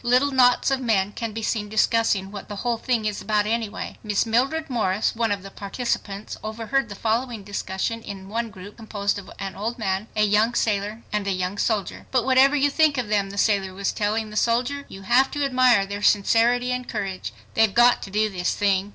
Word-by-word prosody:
Little 250 +4 +3
knots 250 0 +4
of 265 -1 0
men 205 -5 +1
can 230 +1 -4
be 225 +1 -5
seen 210 -1 -1
discussing 215 -3 +1
"what 205 - -8
the 205 - -5
whole 235 -2 0
thing 235 -3 0
is 210 -1 -2
about 210 -1 +1
anyway." 220 -1 -3
Miss 210 -1 0
Mildred 270 +8 +1
Morris, 215 -7 0
one 225 -1 0
of 200 -2 -2
the 195 - -9
participants, 200 -1 -4
overheard 230 +4 -2
the 205 - -7
following 230 0 -1
discussion 205 +2 -3
in 195 -3 -8
one 230 +3 -2
group 200 0 -12
composed 205 -3 -2
of 195 - -12
an 195 -1 -5
old 225 +4 -3
man, 195 -1 -2
a 215 - +3
young 210 +3 +2
sailor 210 +1 -1
and 210 -1 -1
a - - +1
young 185 +2 -2
soldier. 210 -5 -1
"But 255 -3 +1
whatever 265 +2 +5
you 285 0 +2
think 310 -2 +3
of 240 -4 -2
them," 200 -2 +1
the 200 - -8
sailor 195 -3 +1
was 200 0 -1
telling 215 +1 -1
the 210 - -5
soldier, 250 +6 0
"you 195 - -10
have 250 +6 +4
to 290 -1 -1
admire 255 -6 +4
their 200 +1 -5
sincerity 230 +5 +3
and 250 0 -3
courage. 195 -4 -4 0.2
They've 220 -2 +3
got 240 +3 +5
to - - -7
do 210 +2 +1
this 180 -3 -2
thing. 200 -1 +1
215 Hz, 210 wpm, -24 LUFS, 200-240 Hz, 0.2 s, whatever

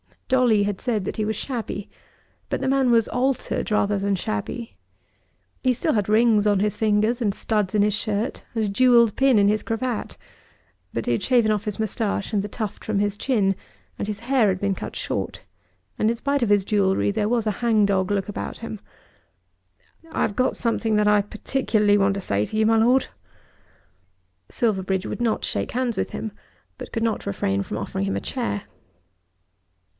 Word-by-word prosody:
Dolly 245 -5 +4
had 200 -2 -2
said 225 -6 -1
that - - -4
he 215 - 0
was 220 +1 -1
shabby, 220 -4 -4 0.6
but - - -2
the - - 0
man 270 -2 +3
was 230 -2 +3
altered 255 0 -1
rather 205 -1 +1
than 200 0 0
shabby. 190 - -4 0.8
He 255 -1 +3
still 305 +6 0
had 210 -2 0
rings 215 -1 +4
on 205 -2 +3
his 210 -1 0
fingers 220 +3 +2
and 205 -3 0
studs 210 -2 -1
in 210 - +4
his 210 0 +3
shirt, 215 +1 -2
and 225 - +1
a 210 - 0
jewelled 235 0 +4
pin 265 -3 +4
in 200 -1 +5
his 210 0 +1
cravat; 230 0 -3 0.8
but 115 - -2
he - - 0
had 120 - +1
shaven 240 -4 +3
off 210 -1 -1
his 210 -1 -3
moustache 215 -2 -2
and 205 - +2
the 205 - -4
tuft 210 0 -5
from 215 -2 -1
his 205 0 0
chin, 205 -7 +1 0.4
and - - -2
his 210 -1 -4
hair 245 -2 +2
had 185 -2 0
been 200 -1 +1
cut - - -7
short, - - -3 0.6
and 215 - +3
in 235 - +1
spite 280 +3 -1
of 235 - +1
his 205 -1 +4
jewellery 200 -1 +2
there 210 0 0
was 235 -2 +1
a 215 - +2
hang 225 -3 +3
dog 190 -2 +1
look 205 0 -1
about 205 - -5
him. 225 -2 -6 1.3
"I've 205 - -1
got 255 0 +2
something 230 -2 0
that 210 0 +3
I 210 0 +5
particularly 210 -1 +1
want 195 0 +2
to 195 - -3
say 100 - 0
to - - -7
you, 220 - +3
my 225 +1 +4
Lord." 245 +4 +4 1.4
Silverbridge 190 -4 0
would - - -4
not 230 -2 0
shake - - -2
hands 245 -2 -1
with - - -1
him, 220 - -4 0.5
but - - -9
could 225 - -1
not 225 -2 -1
refrain 100 0 0
from - - -5
offering 95 - -3
him 95 0 -1
a 100 - -2
chair. 100 -1 -3
215 Hz, 195 wpm, -23 LUFS, 200-235 Hz, 1.4 s, in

